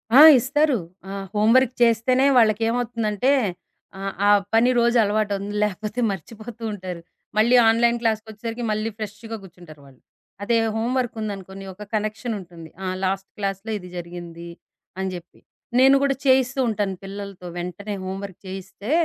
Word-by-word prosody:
ఆ! -, -, +10 dB, 0.2 s
ఇస్తారు. 290 Hz, +2 st, +2 dB, 0.3 s
ఆ! -, -, -5 dB, 0.2 s
హోంవర్క్ 230 Hz, +4 st, +4 dB
చేస్తేనే 240 Hz, +3 st, +3 dB
వాళ్ళకేమవుతుందంటే 230 Hz, +1 st, +2 dB, 0.7 s
ఆహ్, 195 Hz, 0 st, -3 dB
ఆ -, -, +6 dB, 0.2 s
పని 230 Hz, +2 st, +5 dB
రోజు 235 Hz, +1 st, +3 dB
అలవాటవుతుంది. 205 Hz, -1 st, -1 dB
లేపోతే 210 Hz, +3 st, -3 dB
మర్చిపోతూ 220 Hz, +5 st, -8 dB
ఉంటారు. 180 Hz, -3 st, -6 dB, 0.4 s
మళ్ళీ 235 Hz, +3 st, +5 dB
ఆన్‌లైన్ 235 Hz, +1 st, +3 dB
క్లాస్‌కొచ్చేసరికి 225 Hz, +1 st, -3 dB
మళ్ళీ 215 Hz, +1 st, -1 dB
ఫ్రెష్‌గా 220 Hz, +1 st, -6 dB
కూర్చుంటారు 175 Hz, -5 st, -14 dB
వాళ్ళు. 135 Hz, -2 st, -18 dB, 0.4 s
అదే 230 Hz, +3 st, +2 dB, 0.2 s
హోంవర్క్ 240 Hz, +2 st, -1 dB
ఉందనుకోండి, 195 Hz, -2 st, -6 dB
ఒక 205 Hz, +3 st, -10 dB
కనెక్షనుంటుంది. 210 Hz, -6 st, -4 dB, 0.2 s
ఆ -, -, -2 dB, 0.2 s
లాస్ట్ 195 Hz, +1 st, -1 dB
క్లాస్‌లో 200 Hz, +1 st, -3 dB
ఇది 180 Hz, -1 st, -11 dB
జరిగింది 170 Hz, -1 st, -8 dB, 0.5 s
అని 190 Hz, 0 st, -2 dB
జేప్పి. 175 Hz, -1 st, -11 dB, 0.4 s
నేను 270 Hz, +1 st, +7 dB
గూడా, 275 Hz, -1 st, +2 dB
చేయిస్తూ 260 Hz, 0 st, +3 dB
ఉంటాను 205 Hz, -3 st, -1 dB
పిల్లలతో 195 Hz, -2 st, -8 dB
వెంటనే 180 Hz, +4 st, -5 dB
హోంవర్క్ 190 Hz, 0 st, -6 dB
చేయిస్తే, 190 Hz, +4 st, -7 dB
210 Hz, 130 wpm, -23 LUFS, 190-230 Hz, 0.7 s, ఆ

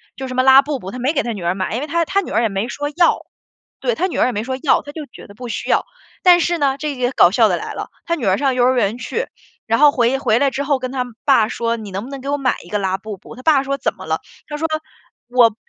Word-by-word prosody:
就 265 Hz, -, -5 dB
什 255 Hz, -, -6 dB
么 255 Hz, -, +3 dB
拉 265 Hz, +1 st, +8 dB
布 285 Hz, -1 st, -3 dB
布， 190 Hz, -3 st, -7 dB
他 250 Hz, -, -7 dB
没 260 Hz, +4 st, +1 dB
给 285 Hz, -, +1 dB
他 235 Hz, -, -3 dB
女 200 Hz, -4 st, -7 dB
儿 175 Hz, +2 st, 0 dB
买。 190 Hz, +2 st, -2 dB
因 245 Hz, -, -2 dB
为 300 Hz, -, -4 dB
他 335 Hz, +3 st, +1 dB
他 395 Hz, +5 st, +1 dB
女 -, -, -8 dB
儿 -, -, +2 dB
也 225 Hz, -, +2 dB
没 195 Hz, +3 st, -2 dB
说 290 Hz, +3 st, -3 dB
要。 350 Hz, -, +3 dB, 0.5 s
对， -, -, 0 dB
他 365 Hz, +3 st, 0 dB
女 355 Hz, -, -5 dB
儿 -, -, +3 dB
也 -, -, 0 dB
没 210 Hz, -2 st, -3 dB
说 260 Hz, +2 st, -3 dB
要， 295 Hz, -, +4 dB
他 290 Hz, -, -10 dB
就 310 Hz, -1 st, -6 dB
觉 -, -, -13 dB
得 200 Hz, -, -14 dB
不 245 Hz, +2 st, -8 dB
需 -, -, -4 dB
要， -, -, +2 dB, 0.4 s
但 355 Hz, -1 st, +7 dB
是 345 Hz, 0 st, +1 dB
呢 275 Hz, -3 st, +1 dB
这 300 Hz, -1 st, -3 dB
个 250 Hz, -1 st, 0 dB
搞 175 Hz, -, +5 dB
笑 220 Hz, +1 st, +4 dB
的 175 Hz, -, +1 dB
来 -, -, -6 dB
了。 -, -, -6 dB, 0.2 s
他 335 Hz, -, 0 dB
女 275 Hz, -9 st, -4 dB
儿 190 Hz, 0 st, +3 dB
上 270 Hz, -2 st, +1 dB
幼 250 Hz, -, +2 dB
儿 255 Hz, +1 st, +4 dB
园 225 Hz, -2 st, +1 dB
去， 455 Hz, -, -3 dB, 0.4 s
然 225 Hz, +1 st, +2 dB
后 295 Hz, +2 st, +6 dB
回 250 Hz, 0 st, +2 dB
回 225 Hz, -3 st, +2 dB
来 280 Hz, -, +3 dB
之 275 Hz, +2 st, -2 dB
后 280 Hz, -2 st, +1 dB
跟 255 Hz, 0 st, -4 dB
她 260 Hz, -2 st, -1 dB, 0.2 s
爸 230 Hz, -6 st, +4 dB
说： 230 Hz, -1 st, -1 dB
“你 215 Hz, -3 st, -8 dB
能 190 Hz, +1 st, -3 dB
不 -, -, -10 dB
能 275 Hz, -1 st, -7 dB
给 275 Hz, -, -5 dB
我 290 Hz, -, +1 dB
买 265 Hz, -3 st, +1 dB
一 170 Hz, -, -15 dB
个 210 Hz, -, 0 dB
拉 190 Hz, -1 st, 0 dB
布 210 Hz, +1 st, -8 dB
布？” 210 Hz, -, -13 dB
她 255 Hz, -, -12 dB
爸 295 Hz, -3 st, +4 dB
说： 275 Hz, 0 st, -1 dB
“怎 -, -, -1 dB
么 -, -, -11 dB
了？” -, -, -1 dB, 0.3 s
她 295 Hz, -, -5 dB
说： 305 Hz, +2 st, -2 dB, 0.7 s
“我“ 230 Hz, -3 st, +6 dB
255 Hz, 335 characters per minute, -19 LUFS, 225-285 Hz, 0.7 s, 拉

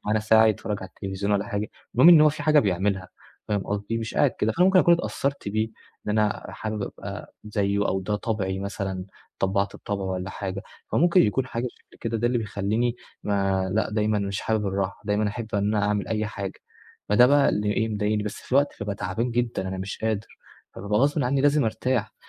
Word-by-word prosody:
على 110 Hz, +1 st, +2 dB
ساعة 110 Hz, +1 st, +5 dB
هيتفرج 105 Hz, -1 st, 0 dB
على 95 Hz, -, -7 dB
التلفزيون 95 Hz, +2 st, -3 dB
والّا 100 Hz, 0 st, +1 dB
حاجة، 105 Hz, -1 st, -2 dB, 0.3 s
المهم 130 Hz, +8 st, +7 dB
إن 170 Hz, -3 st, +9 dB
هو 155 Hz, -, +7 dB
في 150 Hz, 0 st, -4 dB
حاجة 155 Hz, 0 st, +5 dB
بيعملها 95 Hz, -1 st, 0 dB, 0.4 s
فاهم 105 Hz, -1 st, +1 dB
قصدي 105 Hz, +3 st, -2 dB
مش 115 Hz, 0 st, -5 dB
قاعد 145 Hz, -3 st, +4 dB
كده، 110 Hz, 0 st, -1 dB
فأنا 180 Hz, -, +3 dB
ممكن 190 Hz, -1 st, +5 dB
أكون 175 Hz, -1 st, +6 dB
اتأثرت 140 Hz, -7 st, -2 dB
بيه 110 Hz, +2 st, 0 dB, 0.4 s
إن -, -, 0 dB
أنا 105 Hz, -1 st, 0 dB
حابب 110 Hz, -1 st, -4 dB
أبقى -, -, -7 dB
زيه 100 Hz, -1 st, 0 dB
أو 95 Hz, -, 0 dB
ده 105 Hz, +2 st, -1 dB
طبعي 100 Hz, -4 st, -2 dB
مثلًا 95 Hz, -1 st, -4 dB, 0.3 s
اتطبّعت 100 Hz, +1 st, 0 dB
بطبعه 100 Hz, -2 st, -4 dB
والّا 95 Hz, 0 st, -3 dB
حاجة، 95 Hz, 0 st, -5 dB, 0.3 s
فممكن 175 Hz, +2 st, +5 dB
يكون 125 Hz, +5 st, +1 dB
حاجة 120 Hz, 0 st, -3 dB
شكل -, -, -23 dB
كده 115 Hz, 0 st, -2 dB
ده 120 Hz, -, +1 dB
اللي 120 Hz, 0 st, +1 dB
بيخليني 110 Hz, +3 st, -1 dB, 0.3 s
ما 95 Hz, -2 st, 0 dB
لا 110 Hz, +1 st, 0 dB
دايمًا 105 Hz, 0 st, +1 dB
مش 100 Hz, -1 st, -2 dB
حابب 110 Hz, -2 st, 0 dB
الراحة 95 Hz, 0 st, -2 dB
دايمًا 105 Hz, 0 st, +1 dB
أحب 110 Hz, +2 st, -5 dB
إن 100 Hz, 0 st, +1 dB
أنا 100 Hz, 0 st, +2 dB
أعمل 105 Hz, -1 st, -1 dB
أي 110 Hz, -1 st, -1 dB
حاجة. 100 Hz, -2 st, -6 dB, 0.5 s
فده 120 Hz, +4 st, +7 dB
بقى 140 Hz, +1 st, +5 dB
اللي 105 Hz, 0 st, +1 dB
ايه 110 Hz, +1 st, 0 dB
مضايقني 105 Hz, 0 st, 0 dB
بس 105 Hz, -, -4 dB
في 130 Hz, -, -4 dB
وقت 140 Hz, +1 st, +3 dB
بابقى 100 Hz, 0 st, -2 dB
تعبان 105 Hz, +6 st, -2 dB
جدًا 115 Hz, -5 st, -1 dB
أنا 95 Hz, -, -4 dB
مش 95 Hz, +1 st, -5 dB
قادر 110 Hz, -1 st, -1 dB, 0.5 s
فبابقى 105 Hz, +2 st, -1 dB
غصبٍ 145 Hz, +3 st, +2 dB
عني 135 Hz, +2 st, +1 dB
لازم 145 Hz, 0 st, +3 dB
أرتاح 110 Hz, 0 st, -1 dB
105 Hz, 205 wpm, -25 LUFS, 100-115 Hz, 0.5 s, إن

